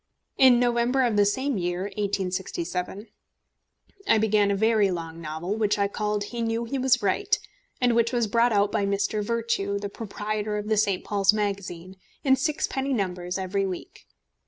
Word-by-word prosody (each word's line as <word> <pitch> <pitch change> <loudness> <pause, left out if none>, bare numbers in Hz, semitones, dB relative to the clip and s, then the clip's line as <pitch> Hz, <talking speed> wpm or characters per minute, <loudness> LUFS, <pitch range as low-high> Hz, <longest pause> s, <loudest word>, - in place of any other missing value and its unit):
In 255 -2 +7
November 245 +2 +2
of 235 -4 +1
the 205 0 +4
same 260 +2 -1
year, 175 +1 -2
1867, 190 -1 -3 1.0
I - - +5
began 210 -1 +3
a 200 - +1
very 220 -1 +3
long 165 -2 -5
novel, 160 +5 -4
which 210 -1 +1
I 200 -1 +2
called 210 0 -2
He 235 +3 -5
Knew 230 0 -1
He 270 +4 -3
Was 260 -2 +2
Right, 405 - +1 0.4
and 245 -1 +3
which 230 0 +2
was 240 -2 +1
brought 235 +3 +2
out 205 -1 +2
by - - 0
Mr. 200 +1 0
Virtue, 225 -3 -1
the 200 0 -4
proprietor 210 0 -4
of 210 +1 -4
the 215 - +2
St. 200 -3 +1
Paul's 200 0 +3
Magazine, 190 -3 -4 0.3
in 265 -2 +5
sixpenny 275 -2 -1
numbers, 180 -4 -2
every 195 +1 -1
week. 185 -2 -8
210 Hz, 170 wpm, -26 LUFS, 195-235 Hz, 1.0 s, In